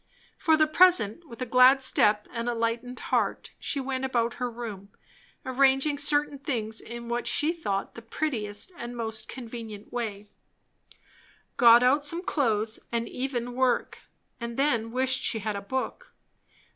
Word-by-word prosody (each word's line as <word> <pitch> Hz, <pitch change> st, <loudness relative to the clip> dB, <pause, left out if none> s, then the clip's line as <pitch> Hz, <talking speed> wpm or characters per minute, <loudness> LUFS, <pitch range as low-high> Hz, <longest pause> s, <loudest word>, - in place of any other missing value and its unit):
For 320 Hz, -4 st, +3 dB
the 310 Hz, -, +5 dB
present, 340 Hz, -, +3 dB
with 235 Hz, +2 st, -6 dB
a -, -, -3 dB
glad 255 Hz, +3 st, +6 dB
step 210 Hz, -4 st, +2 dB
and 235 Hz, 0 st, -3 dB
a 240 Hz, -, -1 dB
lightened 230 Hz, +2 st, -2 dB
heart -, -, 0 dB
she 285 Hz, -, -2 dB
went 265 Hz, -1 st, -3 dB
about 240 Hz, -3 st, 0 dB
her 250 Hz, -, 0 dB
room, 220 Hz, -5 st, -7 dB, 0.6 s
arranging 270 Hz, +2 st, +2 dB
certain 290 Hz, -1 st, +1 dB
things 225 Hz, -6 st, -3 dB
in 235 Hz, 0 st, -8 dB
what 240 Hz, +1 st, -2 dB
she 310 Hz, +3 st, +3 dB
thought 200 Hz, -, -3 dB
the 230 Hz, -, -10 dB
prettiest 230 Hz, -, -3 dB
and 240 Hz, 0 st, -7 dB
most 220 Hz, -1 st, -3 dB
convenient 225 Hz, -4 st, -8 dB
way; 215 Hz, -4 st, -4 dB, 1.3 s
got 240 Hz, -1 st, +7 dB
out 275 Hz, +4 st, +3 dB
some 335 Hz, +4 st, -1 dB
clothes, 225 Hz, -, 0 dB
and 235 Hz, 0 st, -1 dB
even 245 Hz, -2 st, -4 dB
work; 255 Hz, -1 st, 0 dB, 0.4 s
and 235 Hz, -1 st, -6 dB
then 235 Hz, -5 st, +1 dB
wished 260 Hz, +1 st, +2 dB
she 225 Hz, -, +1 dB
had 215 Hz, 0 st, -3 dB
a 200 Hz, -, -4 dB
book. 260 Hz, +6 st, -4 dB
245 Hz, 155 wpm, -27 LUFS, 230-270 Hz, 1.3 s, got